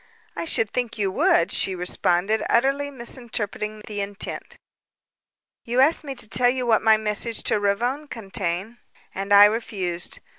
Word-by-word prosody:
"I - - -4
should 225 -9 +1
think 240 -2 -2
you 200 -2 0
would," 170 -2 +2
she 190 - -1
responded, 180 +3 0
utterly 275 +4 +1
misinterpreting 230 -4 -4
his 210 -1 -5
intent. 200 +1 -5 1.1
"You 240 +1 -1
asked 300 +5 +4
me 275 -2 -6
to 235 - -2
tell 245 +3 +3
you 250 0 -1
what 225 -2 +3
my 220 -1 +5
message 215 +1 -1
to - - +1
Ravone 240 +9 -1
contained 195 -2 -4 0.4
and 195 +1 -5
I 205 0 +9
refused. 195 -5 -2
220 Hz, 150 wpm, -23 LUFS, 200-245 Hz, 1.1 s, I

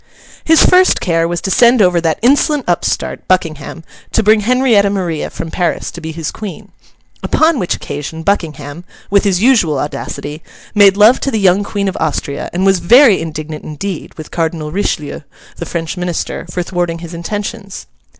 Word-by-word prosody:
His 320 0 +5
first 370 0 +4
care 165 -2 0
was 170 0 -3
to 190 - -3
send 240 +4 +5
over 180 -4 +3
that 160 -2 0
insolent 285 +2 +3
upstart, 175 -1 -2
Buckingham, 165 -3 -2 0.3
to 225 - +2
bring 215 +1 +4
Henrietta 230 -2 +3
Maria 180 -6 -2
from 165 - -7
Paris 175 -2 -2
to 170 - -9
be 160 0 -5
his 160 -1 -4
Queen; 210 -3 -8 0.5
upon 315 -3 +2
which 180 - -1
occasion 150 +3 -6
Buckingham—with 165 +2 -2
his 195 0 +1
usual 215 - +3
audacity—made 170 +8 -1
love 215 +5 +6
to - - -1
the 225 - -1
young 195 0 +3
Queen 200 -1 -3
of 190 - -3
Austria, 145 -3 -3
and 185 +2 -1
was 195 -1 +3
very 235 +5 +5
indignant 155 -1 -6
indeed 160 +4 -6
with 155 - -10
Cardinal 160 -2 -2
Richelieu, 170 -5 -2 0.4
the 170 - -6
French 165 -1 -4
Minister, 175 0 -4
for 180 0 -3
thwarting 175 -1 -2
his 170 0 -9
intentions. 200 +4 -6
180 Hz, 165 wpm, -15 LUFS, 165-205 Hz, 0.5 s, love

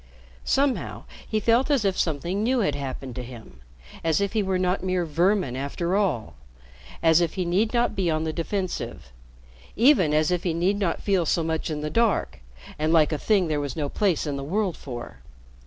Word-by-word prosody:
Somehow 275 -2 0 0.2
he 215 - 0
felt 235 +6 +2
as 275 -8 +2
if 195 -1 +2
something 170 +5 -1
new 245 +2 +2
had 170 -8 +1
happened 135 -2 -5
to 125 - -3
him, 115 - -12 0.4
as 160 -2 +2
if 200 -1 -1
he 220 - +2
were 190 -2 0
not 185 +1 0
mere 185 -2 0
"vermin," 170 -2 +1
after 155 +7 -2
all, 145 - 0 0.7
as 165 +1 +5
if 170 -2 -1
he 185 -2 -1
need 195 +6 +1
not 240 -2 +1
be 185 -3 0
on 155 0 0
the 160 -1 -2
defensive 175 - -4 0.6
even 230 - +5
as 155 +2 +2
if 180 -1 +1
he 170 -3 -1
need 190 +4 +1
not 190 -5 -1
feel 190 -5 +1
so 165 - +1
much 160 0 -2
in 150 -1 -3
the 150 0 -3
dark, 230 - +1 0.4
and 155 +1 +1
like 160 -2 +4
a 155 - -1
thing 200 -2 +2
there 150 -2 0
was 140 -3 -4
no 145 -3 -2
place 190 -3 +1
in 145 -2 -2
the 140 - -5
world 185 +3 -1
for. 120 -3 -8
170 Hz, 205 wpm, -25 LUFS, 150-200 Hz, 0.7 s, as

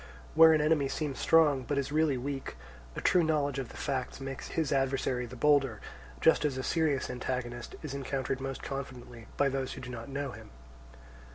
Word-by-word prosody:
Where 160 0 +8
an 155 -1 +4
enemy 150 -2 +2
seems 145 -1 -3
strong 150 -5 +4
but 140 +3 -2
is 140 0 -1
really 155 -3 +2
weak, 135 +2 -4 0.4
a - - -4
true 180 - +4
knowledge 145 -3 +1
of 130 - -5
the - - -11
facts 135 -3 -3
makes 135 0 -6
his 160 -3 -1
adversary 135 -2 0
the 125 - -10
bolder, 135 -4 +3 0.4
just - - +5
as 145 -3 0
a 130 - -3
serious 155 -4 +1
antagonist 125 -1 -4
is 150 -3 -5
encountered 135 -1 -2
most 135 0 -5
confidently 125 -4 -7
by 140 - +3
those 135 -1 -2
who - - -8
do 125 - -7
not 120 +1 -7
know 140 0 -3
him. - - -11
135 Hz, 190 wpm, -30 LUFS, 130-145 Hz, 0.4 s, Where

